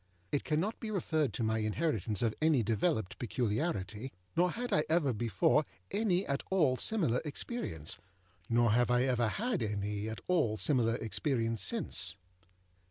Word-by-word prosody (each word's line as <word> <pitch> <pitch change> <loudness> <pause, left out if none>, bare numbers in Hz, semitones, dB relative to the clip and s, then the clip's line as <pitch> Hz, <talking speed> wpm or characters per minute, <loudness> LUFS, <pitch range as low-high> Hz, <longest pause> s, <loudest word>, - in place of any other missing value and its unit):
It 145 - 0
cannot 165 +8 -1
be 225 - -5
referred 160 - 0
to 120 - -2
my 110 0 +1
inheritance 110 - 0
of 115 -2 +2
any 155 -6 +4
developed 110 - 0
peculiarity, 115 - -2 0.2
nor 180 +2 +3
had 245 +5 -3
I 150 - +4
ever 155 -5 +2
before 110 -3 +2 0.3
any 200 -3 +1
at 140 0 -1
all 155 -9 +3
similar 145 - +2
experience, 145 - -3 0.5
nor 120 -1 +4
have 120 +2 +3
I 125 0 +3
ever 125 -3 +2
had 215 - -1
any 105 0 -2
at 110 - -6
all 150 -12 +2
similar 115 -3 +2
experience 115 0 -1
since. 90 -2 -1
125 Hz, 150 wpm, -32 LUFS, 110-160 Hz, 0.5 s, any